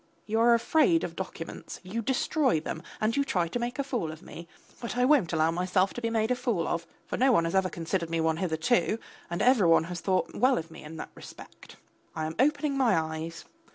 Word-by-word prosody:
You 220 +1 0
are 235 +1 +6
afraid 320 +7 +3
of - - -4
documents, - - -7
you 200 +6 -3
destroy 265 - +1
them, 160 +1 -5 0.2
and 215 +1 +1
you 280 - +2
try 180 -11 0
to 240 - -3
make 240 +1 -3
a 280 - 0
fool 245 - -2
of 155 - -11
me. 170 0 -10 0.3
But 240 0 -5
I 250 - +4
won't 260 - +4
allow 160 0 +2
myself 185 +2 +1
to 240 - -6
be 230 - 0
made 225 +1 0
a - - +3
fool 235 -9 -1
of, 170 0 -2 0.2
for - - -4
no 260 +2 +4
one 170 -8 +3
has 165 - -2
ever 190 -1 +2
considered 170 0 -3
me 165 0 -1
one 160 0 +1
hitherto, 180 +6 +1 0.3
and 175 - -1
every 245 -7 +5
one 165 -1 +5
has 175 +1 -6
thought 185 -2 0
well 255 +2 +3
of 165 0 -5
me 160 - -11
in 155 +2 -9
that - - -7
respect. - - -13 0.4
I 160 -1 -2
am 160 - -3
opening 290 +1 +2
my 260 -8 +3
eyes. 160 +1 -5
190 Hz, 230 wpm, -28 LUFS, 165-245 Hz, 0.4 s, are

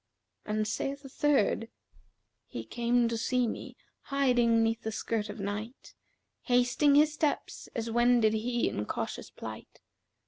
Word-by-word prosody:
'[FN#366] 210 - -1
And 215 0 0
saith 275 +5 -3
a - - -8
third, 265 -5 +1 0.8
'He - - -6
came 240 0 +1
to 230 - -2
see 250 +1 +1
me, - - -6 0.3
hiding 245 -5 +3
neath 225 0 0
the 220 - -3
skirt 220 -1 -2
of 205 +2 -7
night, 210 +5 -5 0.2
* - - -52
Hasting 245 +4 +4
his 300 +1 +5
steps 300 -1 -2
as 230 -1 -2
wended 240 -2 +4
he 235 +2 0
in 105 - -3
cautious - - -4
plight. - - -9
235 Hz, 150 wpm, -30 LUFS, 220-255 Hz, 0.8 s, his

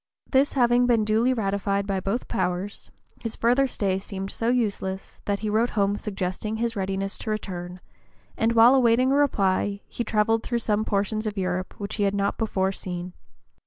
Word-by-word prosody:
This 270 +1 +3
having 245 -1 +4
been 230 -3 +3
duly 220 +4 +3
ratified 200 -3 0
by 195 -1 -1
both 195 +6 -1
the - - -16
powers, 180 +3 -3 0.3
his 230 -1 -5
further 250 +4 +3
stay 195 -6 -1
seemed 195 0 -6
so 230 - -3
useless 200 -6 -2
that 200 0 -1
he 215 - -1
wrote 225 +3 +2
home 200 -1 +1
suggesting 205 +1 -3
his 230 +1 -1
readiness 195 0 -2
to - - -5
return; 180 -4 -4 0.6
and 225 +1 +1
while 230 +2 +7
awaiting 255 0 +4
a - - +3
reply 200 -7 +1
he 240 - -4
travelled 220 +1 +2
through 240 - -2
some 215 -2 0
portions 215 +2 -1
of 210 -1 -4
Europe 185 -1 -2
which 205 +1 -4
he 205 - +1
had 200 0 +1
not 200 0 -1
before 195 -4 0
seen. 180 -2 -5
210 Hz, 185 wpm, -25 LUFS, 195-230 Hz, 0.6 s, while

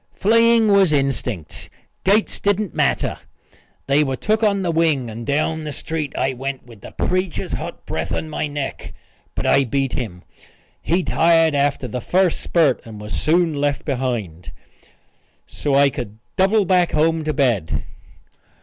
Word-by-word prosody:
Fleeing 230 +1 +4
was 195 -4 +5
instinct. 130 - -2 0.3
Gates 205 +3 +2
didn't 205 -1 0
matter. - - 0 0.7
They 140 +2 +3
were 135 -2 -1
took 215 - 0
on 200 -3 +2
the 175 - 0
wing, 155 -7 +1
and 115 +3 -8
down 155 +2 0
the 150 - -4
street 155 -1 -4
I 135 - 0
went 135 +1 -5
with 115 -5 -15
the - - -9
preacher's 185 -1 -2
hot - - -6
breath 80 +3 -3
on 160 - -2
my 155 0 -3
neck. 145 -1 -5 0.4
But - - -3
I 140 - +4
beat 135 +1 -1
him. 95 -8 -5 0.6
He 175 +3 +1
tired 165 -2 +3
after 140 -2 0
the 125 0 -4
first 185 +3 +1
spurt 155 -7 +2
and 110 -2 -10
was 105 0 -7
soon 165 +1 +2
left 145 -1 -1
behind, 120 - -3 0.9
so 145 -2 -2
I 140 0 +5
could 110 -4 -6 0.2
double 195 +2 +3
back 180 -1 +2
home 160 +1 +2
to 155 - -1
bed. 120 - 0
145 Hz, 160 wpm, -20 LUFS, 130-175 Hz, 0.9 s, was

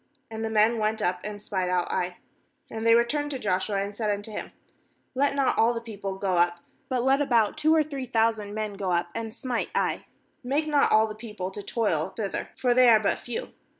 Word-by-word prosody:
And 220 0 -4
the 225 - -1
men 220 +1 +3
went 215 +1 0
up 180 0 0
and 210 -1 -5
spied 190 -3 -2
out 180 -1 0
Ai. 180 0 -2 0.5
3And 220 0 -4
they 230 0 +7
re 235 0 +5
turned 290 +4 -2
to 280 - -3
Joshua, 195 -2 -1
and 200 +1 -6
said 215 -1 -1
unto 205 +1 -3
hinv - - -6 0.6
'Let 280 +2 +1
not 275 -2 +1
all 235 +2 +4
the - - -1
people 205 -4 -6
go 190 -2 0
up; 175 0 +3 0.3
but 255 -2 0
let 270 +2 +3
about 235 -7 +2
two 310 +1 +3
or 315 - +4
three 280 -4 -6
thousand 220 -3 0
men 215 -1 -3
go 195 -2 -3
up 175 0 0
and 225 -1 -4
smite 245 0 -3
Ai; - - 0 0.4
make 280 +5 0
not 295 -2 +3
all 220 0 +5
the 215 - -5
people 210 -4 -6
to 205 - -7
toil 200 -8 -1
thither; 205 -4 -3
for 250 -2 +2
they 250 0 +6
are 220 -2 +7
but 210 - 0
few.' 240 - -5
220 Hz, 225 wpm, -26 LUFS, 200-245 Hz, 0.6 s, they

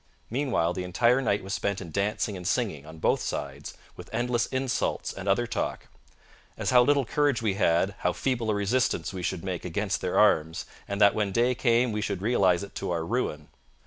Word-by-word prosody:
Meanwhile 125 - 0
the 90 0 -4
entire 120 +8 +2
night 105 -6 0
was 95 +1 -5
spent 100 -1 -1
in 85 -4 -8
dancing 100 +2 -1
and 90 -1 -5
singing, 95 - -1
on 80 +1 -10
both - - +1
sides, 70 0 -5 0.2
with - - -11
endless 120 -1 0
insults 130 -1 -1
and 95 0 -5
other 120 +5 +2
talk; 115 - -3 0.7
as - - -1
how 125 -1 +7
little 140 +1 +3
courage 145 -3 +1
we 105 -3 +1
had, 95 0 +2
how 90 - +1
feeble 120 +1 -1
a 105 - +2
resistance 105 +2 0
we 95 - -5
should 85 - -3
make 95 -2 -4
against 100 +3 -2
their 90 - -1
arms, 90 -4 +3 0.2
and 100 0 -3
that 100 -1 +6
when 105 -2 -1
day 120 +5 +2
came 120 0 +2
we 105 0 -2
should 100 -3 -3
realize 95 -6 +3
it 100 - -9
to - - -4
our 85 -2 -1
ruin. 80 -10 -2
100 Hz, 205 wpm, -27 LUFS, 90-120 Hz, 0.7 s, how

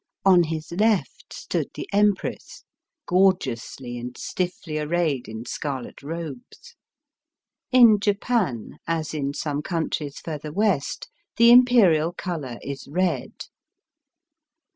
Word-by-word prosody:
On 180 -3 +6
hi^ 160 +2 -5
left 225 - 0
stood - - -3
the - - -6
Empress, 205 -1 0 0.4
gorgeously 135 -9 0
and 125 +1 -7
stiflBy 175 -4 -3
arrayed 155 -5 0
in 110 +1 -7
scarlet 135 -3 -5
robes. 165 - -8 1.0
In 235 -5 +7
Japan, 200 - -1
as 165 -1 -2
in 140 -2 -2
some 145 -2 -2
countries 155 -3 -3
further 150 -2 -6
West, 190 -5 0 0.3
the 235 0 +7
Imperial 210 -10 +5
colour 155 -10 -5
is 140 -1 -6
red. 180 +5 -2
165 Hz, 105 wpm, -24 LUFS, 145-200 Hz, 1.0 s, In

